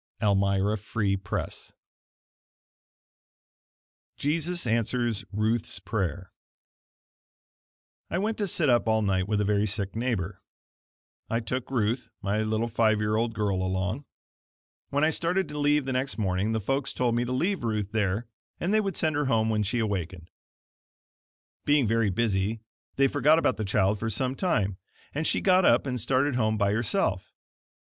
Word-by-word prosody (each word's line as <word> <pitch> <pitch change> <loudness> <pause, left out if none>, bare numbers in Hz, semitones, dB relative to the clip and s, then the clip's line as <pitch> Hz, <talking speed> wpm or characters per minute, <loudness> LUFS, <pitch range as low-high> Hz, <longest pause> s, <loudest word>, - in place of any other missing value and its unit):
Elmira 100 0 +2
Free 100 -1 -1
Press 95 -1 -5 2.4
Jesus 165 +3 -1
Answers 115 -1 0
Ruth's 110 +3 -1
Prayer 95 -3 -3 1.8
I - - -1
went 215 +3 -1
to 205 - 0
sit 165 -3 +1
up 120 -3 +3
all 110 -1 +2
night 95 -2 +1
with 105 -1 0
a - - +1
very 105 +1 +2
sick 100 -1 -2
neighbor. 110 -6 -2 0.9
I 115 - +1
took 125 +2 -3
Ruth, 120 -1 -1
my 100 +2 0
little 110 +1 0
five 110 -2 +2
year 105 0 0
old 115 +1 0
girl 100 -3 0
along. 95 +8 -2 0.8
When 145 +1 +1
I 155 - +4
started 180 +4 0
to 150 - -5
leave 145 -1 +2
the 135 - -2
next 130 +2 -1
morning, 100 +1 0
the 110 - 0
folks 135 +6 -1
told 125 -2 +1
me 120 +1 +1
to 120 - -4
leave 175 +6 0
Ruth 105 -3 -1
there 105 +1 0 0.3
and 185 +4 0
they 215 - +4
would 195 -3 -3
send 155 -2 +1
her 145 0 +1
home 110 -3 +2
when 105 -1 +1
she 105 +4 -1
awakened. 95 -6 -3 1.3
Being 145 -3 +3
very 115 -1 +2
busy, 105 +1 0 0.3
they 135 0 +4
forgot 145 +3 +4
about 130 -8 +1
the 110 - -2
child 100 +1 +2
for 110 - -2
some 130 +4 -1
time, 105 - 0 0.3
and 155 +3 -1
she - - +1
got 185 -1 +4
up - - +4
and 125 -3 -2
started 135 +4 +1
home 110 -3 +1
by 100 -1 +2
herself. 115 0 -1
115 Hz, 160 wpm, -27 LUFS, 100-135 Hz, 2.4 s, I